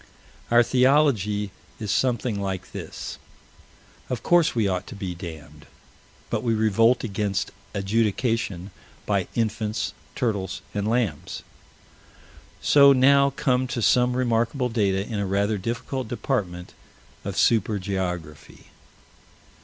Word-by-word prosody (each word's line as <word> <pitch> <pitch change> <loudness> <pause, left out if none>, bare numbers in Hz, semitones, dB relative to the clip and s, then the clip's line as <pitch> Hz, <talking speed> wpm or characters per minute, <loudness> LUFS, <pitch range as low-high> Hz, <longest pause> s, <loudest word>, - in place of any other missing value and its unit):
Our 120 +1 +6
theology 125 -7 +2 0.3
is 105 -2 -3
something 120 -2 0
like 95 -2 -4
this: - - -7 0.9
Of 125 -3 -3
course 170 -4 +3
we 110 -3 +2
ought 90 -1 -2
to 125 - -8
be 95 -3 -4
damned 80 -4 -10 0.6
but - - 0
we 115 -2 +1
revolt 115 +3 +3
against 100 -2 -2 0.2
adjudication 105 -1 0 0.3
by 100 -3 0
infants, 110 -3 -1 0.2
turtles, 100 -6 -2
and 105 0 -1
lambs. 110 -10 -1 1.3
We 140 -1 +9
now 140 +2 +5
come 130 -1 0
to 125 -2 -3
some 125 +2 +3
remarkable 120 +1 +1
data 100 -4 +1
in 110 -2 -4
a 100 - -1
rather 100 +2 0
difficult 120 +4 -3
department 100 -8 -3 0.5
of 100 -1 -5
super 110 -2 +3
geography. 90 -5 -5
110 Hz, 115 wpm, -24 LUFS, 95-125 Hz, 1.3 s, We